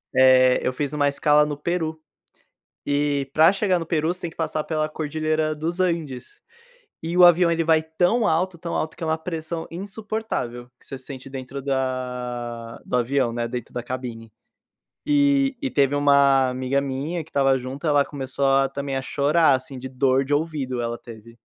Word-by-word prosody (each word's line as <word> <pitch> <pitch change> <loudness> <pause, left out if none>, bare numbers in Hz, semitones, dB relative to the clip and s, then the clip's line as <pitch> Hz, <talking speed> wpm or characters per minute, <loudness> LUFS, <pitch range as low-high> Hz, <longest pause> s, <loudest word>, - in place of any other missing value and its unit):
eh, 130 -1 +6
eu 130 - 0
fiz 145 +2 -3
uma 145 -1 +2
escala 150 +1 +3
no 150 -1 -3
Peru, 160 +1 -3 0.9
e 145 -1 0
pra 160 +4 +6
chegar 195 -3 +1
no 165 - -5
Peru 155 -1 0
você 180 - -12
tem 170 - -4
que - - -21
passar 160 -1 -2
pela 155 -1 -1
Cordilheira 155 0 -1
dos 165 +4 -3
Andes, 170 - -2 0.6
e 165 +2 -3
o 180 - +6
avião 175 0 +6
ele 165 0 +1
vai 160 -1 +3
tão 175 +8 +1
alto, 175 +2 0
tão 170 0 -6
alto, 155 - -3
que - - -7
é - - -1
uma 160 0 +1
pressão 160 0 -5
insuportável 195 - -5
que - - -22
você 135 - -6
sente 130 0 -10
dentro 135 +1 -7
da 125 -3 -3
do - - -3
avião, 125 0 +1
né, 120 0 -2
dentro 120 -1 -6
da 120 - -5
cabine. 120 -3 -6 0.8
E 285 -2 +3
e 275 - -1
teve 140 -4 +2
uma 140 -2 +4
amiga 130 +2 -1
minha, 140 +5 -3
que 160 - -20
estava 135 -2 +2
junto, 130 +5 -5
ela 145 -1 +4
começou 140 -1 -4
a 135 0 +4
também 140 0 -4
a - - -2
chorar, 145 +3 +3
assim, 130 0 -3
de 130 - -6
dor 130 +1 +1
de 145 - -1
ouvido 145 -5 -1
ela 120 0 -3
teve. 115 0 -13
145 Hz, 185 wpm, -23 LUFS, 130-160 Hz, 0.9 s, eh